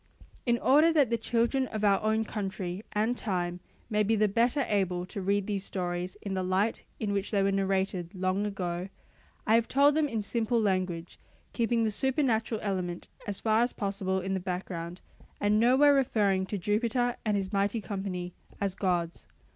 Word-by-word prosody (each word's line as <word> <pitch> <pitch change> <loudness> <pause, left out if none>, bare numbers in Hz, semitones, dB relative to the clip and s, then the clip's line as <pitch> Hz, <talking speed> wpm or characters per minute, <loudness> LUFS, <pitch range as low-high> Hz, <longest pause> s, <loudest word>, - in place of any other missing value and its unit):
In 235 0 +3
order 300 +7 +5
that 285 -7 +3
the - - +3
children 240 +3 +1
of 215 -2 -4
our 200 -1 +4
own 220 +1 +1
country 190 -2 -4
and 220 +4 +1
time 180 -5 -2 0.3
may 210 -2 +1
be 215 +2 +2
the 215 0 +3
better 240 +6 +2
able 185 -3 0
to 200 +2 -6
read 200 +1 +1
these 200 -2 -2
stories 180 -1 -3
in 200 - -3
the 190 - -1
light 190 +4 0 0.2
in 205 -2 -1
which 200 0 -1
they 200 -2 +2
were 195 - +2
narrated 195 -2 -1
long 185 +2 0
ago, 180 -2 -3 0.6
I 215 - +3
have 230 0 +4
told 285 +2 +4
them 310 0 +2
in 225 -5 -2
simple 230 +2 0
language, 185 -5 -1 0.3
keeping 235 -1 +1
the 220 - +1
supernatural 240 -3 0
element 185 -4 -3 0.2
as 200 -2 -3
far 220 0 +2
as 240 +1 +1
possible 195 -2 -1
in 190 +1 -2
the 190 - 0
background, 180 -1 -5 0.4
and 210 +1 +3
nowhere 260 +5 +6
referring 205 -8 +2
to 205 - -3
Jupiter 235 +5 0
and 210 -2 +1
his 195 0 -3
mighty 200 +3 +1
company 185 -2 -4 0.3
as 200 -2 0
gods. 175 -3 -1
200 Hz, 180 wpm, -29 LUFS, 185-230 Hz, 0.6 s, nowhere